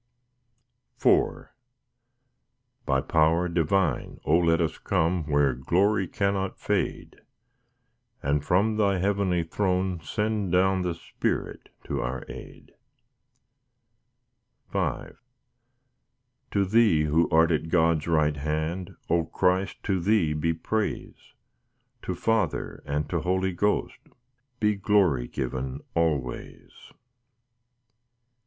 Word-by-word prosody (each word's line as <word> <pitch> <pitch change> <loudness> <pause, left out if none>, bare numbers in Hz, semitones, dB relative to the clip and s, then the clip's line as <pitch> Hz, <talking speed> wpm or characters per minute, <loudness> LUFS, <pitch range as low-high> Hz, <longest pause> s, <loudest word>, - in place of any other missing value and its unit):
IV - - +2 1.4
By 65 0 +2
power 80 +4 +2
divine, 85 -2 0
O 75 - +3
let 85 -1 +3
us 80 -2 -1
come 85 -3 0
Where 70 -3 +2
glory 95 - +1
cannot 100 +1 -1
fade; - - -2 1.0
And 70 0 +1
from 105 +7 +2
Thy 100 -3 +2
heavenly 95 -2 +1
throne 95 0 -1
send 105 +3 -2
down 95 +1 +3
The 90 -2 -2
Spirit - - -4
to - - -3
our 60 +1 -4
aid. - - -11 2.0
V - - -1 1.4
To 100 -1 +1
Thee 105 -6 +4
who 75 +2 +2
art 80 0 +4
at 80 0 -1
God's 80 -2 +2
right 75 -2 +2
hand, 80 +5 -3
O 85 -1 +1
Christ, 95 +3 0
to 95 -2 0
Thee 90 -4 +2
be 75 +2 0
praise, 105 +6 -4 0.7
To - - -4
Father, 115 -1 -1
and 75 +1 -1
to - - +1
Holy 95 +1 0
Ghost, 105 +4 0 0.6
Be 105 -1 +2
glory 95 - +2
given 65 +1 -4
always. 75 -7 -2
85 Hz, 105 wpm, -26 LUFS, 75-95 Hz, 2.0 s, Thee